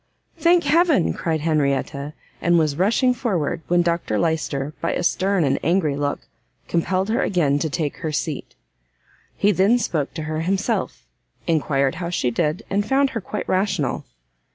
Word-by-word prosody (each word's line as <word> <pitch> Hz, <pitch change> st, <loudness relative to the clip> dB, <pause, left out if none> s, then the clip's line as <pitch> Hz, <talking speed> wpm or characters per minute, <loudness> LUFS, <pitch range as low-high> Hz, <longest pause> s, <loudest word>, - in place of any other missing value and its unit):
"Thank 345 Hz, 0 st, +3 dB
Heaven!" 305 Hz, -, +3 dB
cried 160 Hz, -2 st, -2 dB
Henrietta, 145 Hz, -1 st, 0 dB, 0.3 s
and 175 Hz, 0 st, +3 dB
was 155 Hz, -3 st, +2 dB
rushing 230 Hz, -, +3 dB
forward, 180 Hz, -, -1 dB
when 175 Hz, 0 st, +3 dB
Dr 170 Hz, -10 st, 0 dB
Lyster, 150 Hz, -1 st, -1 dB
by 165 Hz, -, 0 dB
a -, -, -2 dB
stern 190 Hz, +1 st, +1 dB
and 135 Hz, -, +1 dB
angry 165 Hz, -3 st, +2 dB
look, 145 Hz, 0 st, -2 dB, 0.5 s
compelled 185 Hz, +4 st, 0 dB
her 225 Hz, -, +1 dB
again 150 Hz, -7 st, +1 dB
to 160 Hz, -, -1 dB
take 145 Hz, 0 st, -2 dB
her 160 Hz, -, -3 dB
seat. 150 Hz, -1 st, -4 dB, 0.8 s
He 205 Hz, -, +3 dB
then 200 Hz, +5 st, +4 dB
spoke 160 Hz, -, -2 dB
to 160 Hz, -, -4 dB
her 155 Hz, 0 st, -3 dB
himself, 190 Hz, +4 st, -1 dB, 0.4 s
enquired 140 Hz, -4 st, +1 dB
how 170 Hz, -, -2 dB
she 130 Hz, -8 st, 0 dB
did, 155 Hz, -, -1 dB
and 200 Hz, +1 st, 0 dB
found 270 Hz, +4 st, +2 dB
her 225 Hz, -, -3 dB
quite 210 Hz, -, -5 dB
rational. 185 Hz, -8 st, 0 dB
170 Hz, 160 wpm, -22 LUFS, 150-195 Hz, 0.8 s, then